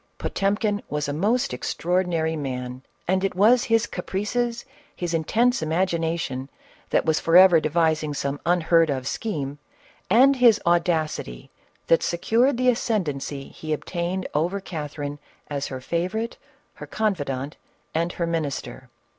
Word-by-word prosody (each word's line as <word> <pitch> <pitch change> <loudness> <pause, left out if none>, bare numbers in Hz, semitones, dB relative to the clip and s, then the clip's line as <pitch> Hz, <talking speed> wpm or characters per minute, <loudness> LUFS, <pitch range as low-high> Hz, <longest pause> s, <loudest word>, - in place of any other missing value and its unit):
Potemkin 205 +1 0
was 150 0 -2
a 145 - -2
most 230 - +1
extraordinary 170 -2 -1
man, 125 -3 -4 0.3
and 190 +1 +1
it 195 -2 -1
was 230 +6 +5
his 225 0 +3
caprices, 235 +5 -2 0.3
his 175 -1 -3
intense 230 +9 +2
imagination 165 -5 -1 0.4
that - - +2
was 160 -1 +2
forever 175 0 +7
d< 155 - -1
vising 155 -2 +1
some 140 0 -2
unheard 170 -1 +3
of 130 -2 -2
scheme, 145 -5 -3 0.5
and 270 +3 +6
his 235 -4 +6
audacity 165 - 0 0.3
that 165 - +4
secured 235 +9 +2
the 255 0 +3
ascendency 150 - -2
he 155 -1 -5
obtained 175 +4 -3
over 170 +7 0
Cathe 155 -6 -6
rine 145 0 -4 0.3
as 140 -1 -2
her 130 - -6
favorite, 185 - -2 0.4
her - - -10
confidant, 145 -10 -2 0.4
and 170 +2 0
her 170 - -2
minister. 150 -5 -4
170 Hz, 135 wpm, -24 LUFS, 150-200 Hz, 0.5 s, forever